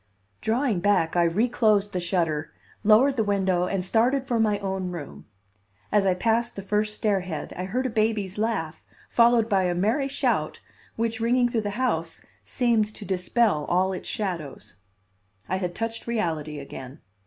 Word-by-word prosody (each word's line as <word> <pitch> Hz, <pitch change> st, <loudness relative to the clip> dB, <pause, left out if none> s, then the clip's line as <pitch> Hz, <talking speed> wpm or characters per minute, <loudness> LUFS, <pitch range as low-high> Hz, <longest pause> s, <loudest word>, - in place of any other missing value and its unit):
Drawing 230 Hz, -3 st, +1 dB
back, 185 Hz, -4 st, +2 dB
I 175 Hz, -, +4 dB
reclosed 210 Hz, +3 st, +2 dB
the 180 Hz, -, -1 dB
shutter, 165 Hz, -4 st, -1 dB, 0.3 s
lowered 240 Hz, +6 st, +5 dB
the 220 Hz, -, +3 dB
window 190 Hz, -3 st, +1 dB
and 190 Hz, -2 st, -1 dB
started 250 Hz, +7 st, +2 dB
for 240 Hz, -3 st, 0 dB
my 215 Hz, -2 st, +2 dB
own 190 Hz, -2 st, -3 dB
room. 145 Hz, -, -8 dB, 0.6 s
As 205 Hz, -2 st, +3 dB
I 185 Hz, -, +3 dB
passed 230 Hz, +5 st, 0 dB
the 195 Hz, -, -6 dB
first 210 Hz, +2 st, 0 dB
stair 205 Hz, -3 st, +1 dB
head, 180 Hz, -4 st, -6 dB
I 180 Hz, -, -4 dB
heard 250 Hz, +7 st, -2 dB
a -, -, +1 dB
baby's 215 Hz, -3 st, 0 dB
laugh, 165 Hz, -8 st, -2 dB, 0.3 s
followed 235 Hz, -1 st, +4 dB
by 195 Hz, -4 st, +2 dB
a 175 Hz, -1 st, 0 dB
merry 220 Hz, +10 st, +1 dB
shout, 275 Hz, +1 st, -1 dB, 0.4 s
which, 225 Hz, 0 st, -1 dB
ringing 240 Hz, +2 st, +2 dB
through 235 Hz, -2 st, 0 dB
the 205 Hz, -, -6 dB
house, 165 Hz, -11 st, -1 dB, 0.2 s
seemed 230 Hz, -4 st, +1 dB
to 205 Hz, -, -8 dB
dispel 190 Hz, -3 st, +1 dB
all 185 Hz, +2 st, +1 dB
its 185 Hz, -, -6 dB
shadows. 170 Hz, -, -5 dB, 0.7 s
I 185 Hz, -, -1 dB
had 180 Hz, -2 st, -3 dB
touched 225 Hz, +1 st, -4 dB
reality 160 Hz, -10 st, -2 dB
again. 135 Hz, -1 st, -9 dB
205 Hz, 165 wpm, -25 LUFS, 180-230 Hz, 0.7 s, lowered